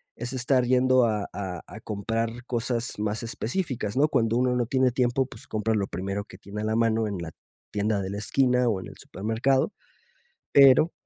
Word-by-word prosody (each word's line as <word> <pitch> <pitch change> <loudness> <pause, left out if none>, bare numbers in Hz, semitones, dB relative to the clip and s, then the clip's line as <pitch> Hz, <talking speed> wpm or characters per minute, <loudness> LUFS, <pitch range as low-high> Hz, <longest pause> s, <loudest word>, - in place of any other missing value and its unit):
es 120 +3 -5
estar 125 0 +2
yendo 130 0 +4
a 105 -2 -1
a 95 -4 -5
a 105 - -10
comprar 115 +3 -3
cosas 120 -1 -2
más 105 +2 -1
específicas, 115 - -3
¿no? 145 +3 +4
Cuando 115 -3 +1
uno 125 0 +2
no 120 -1 +1
tiene 130 0 +2
tiempo, 125 +1 +1
pues 110 - -13
compra 110 +1 0
lo 100 -1 0
primero 100 +2 -4
que 95 - -13
tiene 105 +2 -7
a - - -2
la 110 0 0
mano 115 -1 +2
en 100 -4 -4
la 85 -1 -6 0.4
tienda 105 0 0
de 95 - -4
la 100 - -4
esquina 125 +3 +2
o 100 -5 0
en - - -9
el - - -12
supermercado, 115 +7 0 0.8
pero 140 +4 +7
115 Hz, 195 wpm, -26 LUFS, 105-125 Hz, 0.8 s, pero